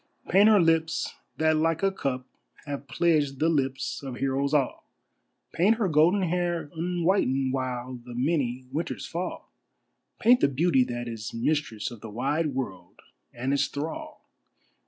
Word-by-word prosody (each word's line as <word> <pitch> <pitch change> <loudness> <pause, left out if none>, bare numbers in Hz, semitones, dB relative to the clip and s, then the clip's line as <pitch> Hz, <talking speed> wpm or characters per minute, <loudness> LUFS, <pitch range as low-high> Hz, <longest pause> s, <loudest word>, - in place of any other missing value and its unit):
Paint 200 +5 +6
her 215 -2 +6
lips 165 -1 +1 0.2
that 160 0 +3
like 165 +2 +1
a 195 - +3
cup 130 -8 -3 0.4
have 140 -1 -5
pledged 150 -5 +1
the 160 +4 +2
lips 135 -4 -1
of 135 -3 -6
heroes 135 +2 0
all, 145 -4 0 0.6
Paint 200 +7 +4
her 220 -3 0
golden 170 +5 +4
hair 175 -3 -1
unwhitened 165 -6 +1
while 125 -1 -3
the 120 -1 -9
many 130 -2 0
winters 160 +3 -3
fall, 175 +2 -5 0.7
Paint 245 +2 +6
the - - +4
beauty 140 0 +3
that 120 0 -4
is 115 -1 -6
mistress 115 -3 -1
of 120 - -10
the 115 - -8
wide 140 +6 -1
world 95 -9 -5 0.3
and 130 +3 -2
its 140 - +2
thrall! 300 - -6
145 Hz, 150 wpm, -27 LUFS, 130-170 Hz, 0.7 s, Paint